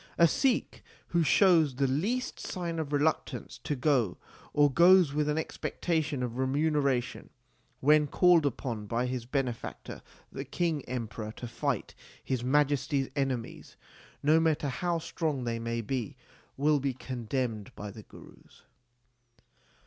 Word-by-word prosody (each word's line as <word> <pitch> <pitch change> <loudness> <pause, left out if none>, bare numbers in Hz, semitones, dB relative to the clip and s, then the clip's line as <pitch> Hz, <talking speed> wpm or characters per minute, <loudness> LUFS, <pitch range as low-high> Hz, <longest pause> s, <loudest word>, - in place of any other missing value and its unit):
A 170 - +7
Sikh 255 - 0 0.3
who 170 - +2
shows 165 -4 +4
the 135 +1 +1
least 195 - -1
sign 170 -2 -4
of 150 -2 -4
reluctance 150 +2 -1
to 145 - -3
go, 125 - +1 0.3
or 145 -1 +4
goes 175 0 +6
with 150 0 0
an 150 - 0
expectation 160 -3 -2
of 125 0 -4
remuneration, 140 -2 0 0.5
when 150 +2 +5
called 175 0 +5
upon 120 -6 -3
by 115 +3 0
his 125 -2 -4
benefactor 130 -4 -4 0.3
the 135 - -5
King 155 +2 -1
Emperor 110 -3 -4
to 120 - -7
fight 120 - -2 0.3
His 130 -3 -2
Majesty 145 +1 +2
s - - -8
enemies, 135 -5 -3 0.5
no 155 +3 +5
matter 155 -3 +1
how 175 +5 -1
strong 155 -4 -2
they 115 -1 -2
may 115 0 -2
be, 120 -1 -4 0.4
will 145 +1 +3
be 135 -2 -2
condemned 120 -4 -3
by 105 0 -7
the 110 - -10
Gurus. - - -17
140 Hz, 140 wpm, -29 LUFS, 125-160 Hz, 0.5 s, A